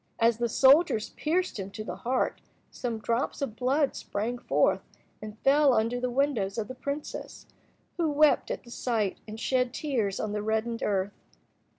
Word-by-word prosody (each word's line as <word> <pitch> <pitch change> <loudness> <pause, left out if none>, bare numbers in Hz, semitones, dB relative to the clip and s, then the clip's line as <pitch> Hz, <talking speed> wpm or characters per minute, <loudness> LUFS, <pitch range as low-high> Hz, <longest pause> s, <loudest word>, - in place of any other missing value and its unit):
As 230 0 +3
the 240 -1 0
soldiers 270 -2 +4
pierced 350 - -1
him 195 0 -4
to 215 - -5
the 180 -4 -6
heart, 250 +6 -1 0.3
some 235 -3 -3
drops 230 +4 -1
of 270 -6 -3
blood 270 +4 +1
sprang 230 +4 -3
forth, - - +2 0.4
and 215 0 -8
fell 280 0 +5
under 230 +3 +1
the 250 0 -1
windows 240 -7 0
of 220 -2 -2
the 255 - -6
princess, 280 +3 -6 0.5
who 335 -3 +1
wept 295 0 +4
at - - -4
the 235 - -14
sight 225 -6 -1
and 215 +1 -7
shed 250 0 0
tears 230 -10 -1
on 215 - -2
the 210 0 -2
reddened 220 +2 -1
earth. 200 -1 0
235 Hz, 175 wpm, -28 LUFS, 215-275 Hz, 0.5 s, fell